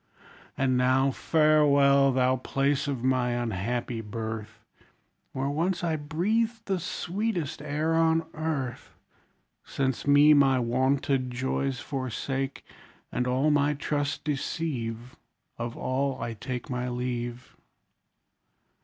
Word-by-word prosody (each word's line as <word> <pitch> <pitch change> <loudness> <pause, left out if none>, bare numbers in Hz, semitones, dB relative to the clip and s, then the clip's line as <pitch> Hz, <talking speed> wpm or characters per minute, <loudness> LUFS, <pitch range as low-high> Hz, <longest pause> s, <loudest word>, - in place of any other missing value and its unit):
And 130 -1 +2
now 130 +2 +3
farewell! 140 -2 +4
thou 130 0 +2
place 135 +3 0
of 135 -4 -3
my 130 -2 +2
unhappy 120 +1 -2
birth, 110 0 -6 0.7
Where 135 +1 -2
once 170 +5 -1
I 165 -2 +1
breathed 215 +10 -1
the 190 -2 -1
sweetest 180 -2 -3
air 150 +2 -1
on 165 0 +3
earth; 155 -6 -4 0.7
Since 135 -1 -2
me 145 +1 +7
my 135 -2 +5
wonted 130 +2 +1
joys 130 +1 -2
forsake, 135 0 -3 0.5
And 125 - -1
all 130 +4 +2
my 145 0 +2
trust 145 0 -2
deceive; 130 -5 -3 0.4
Of 120 0 -4
all 135 +1 -1
I 115 0 -3
take 125 +2 -5
My 125 0 -2
leave. 120 0 -4
135 Hz, 110 wpm, -27 LUFS, 125-150 Hz, 0.7 s, me